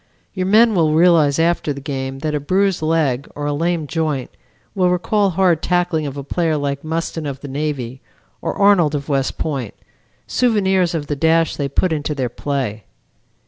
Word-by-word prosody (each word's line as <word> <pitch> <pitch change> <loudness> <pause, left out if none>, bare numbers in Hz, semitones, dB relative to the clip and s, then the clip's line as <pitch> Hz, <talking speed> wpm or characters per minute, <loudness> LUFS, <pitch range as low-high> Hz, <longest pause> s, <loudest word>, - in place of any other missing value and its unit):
Your 185 -1 -2
men 220 +3 +5
will 160 -5 +2
realize 160 -4 +4
after 165 -2 +1
the 140 - -5
game 135 -2 -4
that 155 - 0
a 150 - 0
bruised 190 +5 +1
leg 155 -5 0
or 145 - -4
a 145 - 0
lame 165 +1 -1
joint 150 -4 -2 0.4
will 185 -3 +2
recall 195 +3 +1
hard 180 -3 +2
tackling 175 -4 0
of 140 0 -6
a 140 - -5
player 160 +2 0
like 140 -1 -3
Mustin 160 -1 -3
of 140 -1 -6
the 145 - -7
Navy, 135 -3 -4 0.4
or - - -3
Arnold 190 -7 +4
of 140 +1 -4
West 135 -2 0
Point, 135 -9 -3 0.5
souvenirs 190 -7 +1
of 150 -3 -2
the 145 - -2
dash 160 +2 +2
they 140 -1 -2
put 170 +5 +1
into 150 0 -2
their 130 -3 -1
play. 130 -8 -3
155 Hz, 185 wpm, -19 LUFS, 140-175 Hz, 0.5 s, men